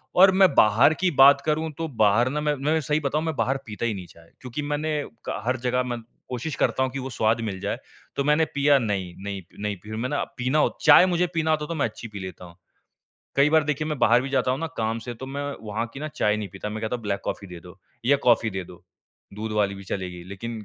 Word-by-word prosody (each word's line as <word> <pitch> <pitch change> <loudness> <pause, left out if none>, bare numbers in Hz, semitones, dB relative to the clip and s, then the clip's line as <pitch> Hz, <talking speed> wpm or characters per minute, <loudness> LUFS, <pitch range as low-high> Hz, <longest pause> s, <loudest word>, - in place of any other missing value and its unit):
और 190 +1 +8
मैं 190 -4 +5
बाहर 115 +8 +5
की 180 +2 0
बात 140 -1 +7
करूँ 155 +1 0
तो, 165 - -2
बाहर 115 -2 +3
ना 150 +3 -2
मैं 150 0 +1
मैं 150 +4 +1
सही 150 +2 0
बताऊँ 150 +1 -1
मैं 160 -2 -2
बाहर 135 0 0
पीता 105 +1 -4
ही 115 - 0
नहीं 95 -3 -7
चाय। 85 -1 -19
क्योंकि 125 +2 -5
मैंने 150 +1 -1 0.2
कहा - - -4
हर 125 +2 +1
जगह 125 +1 0
मैं 120 -1 -4 0.3
कोशिश 130 +4 -4
करता 130 - +1
हूँ 130 - -1
कि 135 - -4
वो 130 0 -5
स्वाद 115 -2 +1
मिल 100 -4 -4
जाए। - - -2 0.4
तो 140 - 0
मैंने 150 +3 +3
पिया 145 0 +5
नहीं 100 -6 -2
नहीं 100 -1 -4
पी - - -13
नहीं 105 -1 -2
पी 105 - -10
मैंने 125 +6 -2 0.2
पीना 130 +4 +1
हो - - +1
चाय 150 +3 +8
मुझे 180 -1 +1
पीना 160 -1 +1
होता 150 -1 0
तो 170 - -4
मैं 145 - +1
अच्छी 115 +1 -6
पी 105 -2 -8
लेता 95 -1 -8
हूँ। 85 -1 -14 0.8
कई 140 +2 +5
बार 155 -1 +4
देखिए 150 +1 -1
मैं 150 -2 -3
बाहर 120 +1 +5
भी 135 - -4
जाता 130 -2 +1
हूँ 130 +2 -1
ना 165 - -1
काम 110 0 -1
से 120 - -4
तो 130 +3 -8
मैं 140 +2 -4 0.2
वहाँ 110 +3 -2
की 135 - -7
ना 155 - -3
चाय 105 0 +1
नहीं 105 -2 -4
पीता। 95 +2 -5
मैं 110 +1 -5
कहता 110 +3 -1
हूँ 120 - -13
ब्लैक 100 -2 -2
कॉफ़ी 100 - -4
दे 90 -1 -9
दो 90 +2 -14 0.3
या 140 +2 +5
कॉफ़ी 115 -1 +4
दे 95 -2 -4
दो। 90 +1 -15 0.5
दूध 110 +1 -4
वाली 105 -2 +1
भी 100 0 -10
चलेगी 90 -2 -5
लेक़िन 110 +3 -6
125 Hz, 260 wpm, -25 LUFS, 105-150 Hz, 0.8 s, और